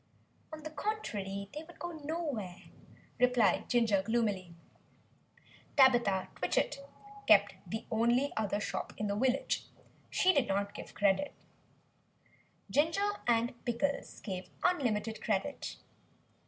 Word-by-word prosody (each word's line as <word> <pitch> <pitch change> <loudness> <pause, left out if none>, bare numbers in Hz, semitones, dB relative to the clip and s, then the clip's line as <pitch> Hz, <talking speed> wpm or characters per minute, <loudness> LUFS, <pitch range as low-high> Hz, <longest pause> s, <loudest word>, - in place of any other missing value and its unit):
"On 310 -1 -8
the 310 - -6
contrary, 205 - -3
they 300 - -5
would 335 +2 -14
go 345 - -5
nowhere," 290 - -4 0.6
replied 250 -3 +3
Ginger 225 -5 +3
gloomily. 200 -5 -1 1.2
(Tabitha 240 -8 +5
Twitchit 290 - 0 0.5
kept 205 -1 +6
the 220 +6 -4
only 235 +5 +2
other 205 -2 0
shop - - -3
in 210 - -2
the 200 -1 0
village. 260 +4 +1 0.4
She 370 0 +4
did 275 -6 +2
not 200 +1 0
give - - -9
credit.) 205 +8 +2 1.4
Ginger 330 +8 +2 0.2
and 235 +1 +1
Pickles 280 +4 -2
gave 185 -3 -5
unlimited 225 -10 +1
credit. 215 +7 -2
235 Hz, 115 wpm, -33 LUFS, 205-290 Hz, 1.4 s, kept